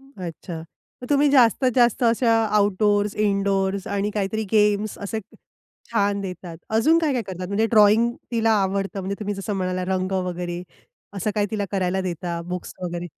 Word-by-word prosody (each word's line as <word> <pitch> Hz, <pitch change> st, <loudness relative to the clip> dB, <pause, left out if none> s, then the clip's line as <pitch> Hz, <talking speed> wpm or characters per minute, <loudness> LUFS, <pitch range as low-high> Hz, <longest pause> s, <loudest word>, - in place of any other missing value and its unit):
अच्छा. 180 Hz, -, -8 dB, 0.4 s
तर 250 Hz, -, -7 dB
तुम्ही 290 Hz, 0 st, +4 dB
जास्तीत 255 Hz, -1 st, +4 dB
जास्त 240 Hz, -1 st, +3 dB
अशा 230 Hz, 0 st, +3 dB, 0.2 s
आउटडोर्स, 205 Hz, 0 st, +2 dB
इनडोर्स 200 Hz, -2 st, 0 dB
आणि 200 Hz, +1 st, -1 dB
काहीतरी 210 Hz, +1 st, -2 dB
गेम्स 210 Hz, -1 st, +2 dB
असे 205 Hz, +2 st, -4 dB, 0.7 s
छान 205 Hz, -3 st, +1 dB
देतात. 180 Hz, -3 st, -7 dB
अजून 270 Hz, +10 st, +4 dB
काय 315 Hz, -3 st, +1 dB
काय 250 Hz, -3 st, 0 dB
करतात? 185 Hz, -2 st, -6 dB
म्हणजे 200 Hz, +4 st, +1 dB
ड्रॉइंग 220 Hz, +2 st, +5 dB, 0.2 s
तिला 225 Hz, -1 st, +2 dB
आवडतं, 195 Hz, +1 st, -2 dB
म्हणजे 190 Hz, +1 st, -3 dB
तुम्ही 205 Hz, -1 st, -2 dB
जसं 195 Hz, +2 st, -4 dB
म्हणालात 185 Hz, -1 st, -2 dB
रंग 185 Hz, 0 st, -1 dB
वगैरे, 180 Hz, -1 st, -3 dB, 0.5 s
असं 200 Hz, +2 st, -1 dB
काय 205 Hz, -1 st, +1 dB
तिला 210 Hz, -2 st, -1 dB
करायला 190 Hz, -1 st, 0 dB
देता, 175 Hz, -2 st, -3 dB
बुक्स 180 Hz, 0 st, -5 dB
वगैरे? 175 Hz, 0 st, -4 dB
200 Hz, 160 wpm, -23 LUFS, 185-220 Hz, 0.7 s, ड्रॉइंग